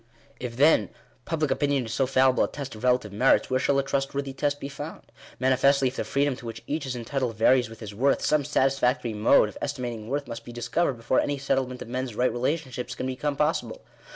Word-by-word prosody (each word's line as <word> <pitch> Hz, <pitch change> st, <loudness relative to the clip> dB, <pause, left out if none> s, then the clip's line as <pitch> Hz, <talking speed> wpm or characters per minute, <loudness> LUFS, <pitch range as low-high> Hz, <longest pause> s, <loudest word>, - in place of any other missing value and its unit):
If, 120 Hz, -2 st, -6 dB
then, 140 Hz, -, +4 dB, 0.4 s
public 155 Hz, -3 st, -1 dB
opinion 140 Hz, -3 st, +1 dB
is 110 Hz, -, -5 dB
so 135 Hz, -, +1 dB
fallible 130 Hz, -1 st, +3 dB
a -, -, -4 dB
test 140 Hz, -2 st, -7 dB
of 110 Hz, +2 st, -11 dB
relative 125 Hz, -5 st, +1 dB
merits, 130 Hz, +5 st, +3 dB
where 130 Hz, -, +2 dB
shall 140 Hz, +1 st, +2 dB
a 135 Hz, -, +2 dB
trustworthy 135 Hz, 0 st, -2 dB
test 145 Hz, +1 st, -1 dB
be 140 Hz, -, -5 dB
found? 145 Hz, +3 st, -9 dB, 0.3 s
Manifestly, 130 Hz, +1 st, +3 dB
if 130 Hz, -, -12 dB
the -, -, -2 dB
freedom 140 Hz, -1 st, 0 dB
to -, -, -11 dB
which 115 Hz, 0 st, -7 dB
each 150 Hz, +1 st, -3 dB
is 130 Hz, -, -3 dB
entitled 125 Hz, 0 st, -2 dB
varies 120 Hz, +1 st, +3 dB
with 115 Hz, 0 st, -12 dB
his 105 Hz, -2 st, -7 dB
worth, 135 Hz, +7 st, +1 dB
some 150 Hz, -1 st, +2 dB
satisfactory 130 Hz, -3 st, +1 dB
mode 105 Hz, 0 st, +4 dB
of 105 Hz, -, -10 dB
estimating 120 Hz, -6 st, -4 dB
worth 145 Hz, +1 st, -2 dB
must 115 Hz, -, -7 dB
be -, -, -10 dB
discovered 120 Hz, +7 st, 0 dB
before 120 Hz, +2 st, 0 dB
any 145 Hz, -1 st, 0 dB
settlement 130 Hz, -2 st, -1 dB
of -, -, -14 dB
men's 125 Hz, -1 st, -4 dB
right 125 Hz, +2 st, +2 dB
relationships 125 Hz, -1 st, -2 dB
can -, -, -4 dB
become 135 Hz, +3 st, -2 dB
possible. 160 Hz, -, -1 dB
130 Hz, 215 wpm, -26 LUFS, 120-140 Hz, 0.4 s, then